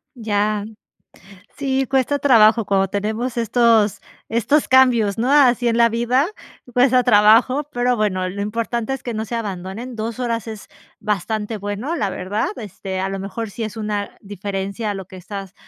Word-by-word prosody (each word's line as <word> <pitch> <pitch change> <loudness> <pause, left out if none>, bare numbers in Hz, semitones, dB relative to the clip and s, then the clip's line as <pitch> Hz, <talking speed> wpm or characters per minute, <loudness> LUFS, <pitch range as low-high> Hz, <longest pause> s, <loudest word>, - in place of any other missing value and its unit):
Ya. 210 -2 -1 0.9
Sí, 270 -1 0
cuesta 270 +1 +1
trabajo 230 -5 +5
cuando 195 -1 +2
tenemos 220 +5 -3
estos 230 -3 +3 0.3
estos 235 +7 +1
cambios, 240 -6 +4
¿no?, 250 +4 +1
así 250 -4 +4
en 230 - +1
la 235 0 +6
vida, 240 +4 +1 0.5
cuesta 250 0 +4
trabajo, 230 +5 +5
pero 245 -1 +1
bueno, 190 -4 0
lo 200 +2 -5
importante 230 +3 -2
es 265 - -6
que 240 - -4
no 220 0 -2
se 235 +2 -5
abandonen, 205 +3 -5
2 225 +2 -4
horas 230 -3 -2
es 220 -2 -8 0.3
bastante 210 +2 -2
bueno, 205 - -4
la 205 - -1
verdad, 200 +5 -2
este 190 -2 -6
a 190 - -1
lo 195 - -4
mejor 205 +3 -5
sí 230 - -8
es 215 0 -6
una 210 -2 -3
diferencia 200 +2 -4
a 205 - -1
lo 190 -2 -7
que 190 - -13
estás 195 +1 -8
220 Hz, 170 wpm, -20 LUFS, 205-245 Hz, 0.9 s, la